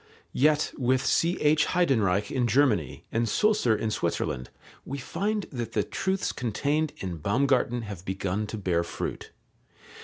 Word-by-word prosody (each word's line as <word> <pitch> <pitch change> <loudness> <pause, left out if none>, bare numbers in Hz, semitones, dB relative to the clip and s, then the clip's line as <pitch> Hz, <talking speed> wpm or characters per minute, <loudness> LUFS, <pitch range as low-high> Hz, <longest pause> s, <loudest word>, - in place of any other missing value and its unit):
Yet 150 +2 +2
with 130 +1 +2
C.H. 155 -3 +3
Heydenreich 110 - +1
in 125 -3 +1
Germany 110 - +1
and 115 0 0
Sulzer 210 - +3
in 110 +1 -2
Switzerland 65 -10 -2 0.3
we 140 - -5
find 205 +9 -2
that 120 -4 -5
the 105 - +2
truths 190 - -1
contained 145 +6 -1
in 90 -3 -5
Baumgarten 120 - +1
have 100 -5 -7
begun 95 +2 -2
to 110 - -5
bear 90 -4 0
fruit. - - -5
120 Hz, 135 wpm, -27 LUFS, 105-145 Hz, 0.3 s, C.H